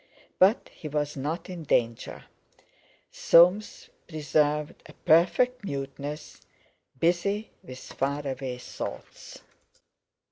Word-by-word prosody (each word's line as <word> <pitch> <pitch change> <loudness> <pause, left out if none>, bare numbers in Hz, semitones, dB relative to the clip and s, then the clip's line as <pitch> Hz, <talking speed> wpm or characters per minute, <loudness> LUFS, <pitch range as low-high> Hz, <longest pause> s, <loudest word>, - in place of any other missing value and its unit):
But 195 +6 +4
he 155 - -8
was 150 0 -2
not 150 +6 -4
in 180 -3 -7
danger. 115 -6 -1 0.9
Soames 180 +5 +4 0.2
preserved 150 -1 0
a - - -14
perfect 210 +10 +3
muteness, 140 -1 -6 0.6
busy 200 +6 0
with 130 0 -10
far 140 +3 -3
away 130 -1 -4
thoughts. 125 - -8
150 Hz, 95 wpm, -27 LUFS, 140-180 Hz, 0.9 s, But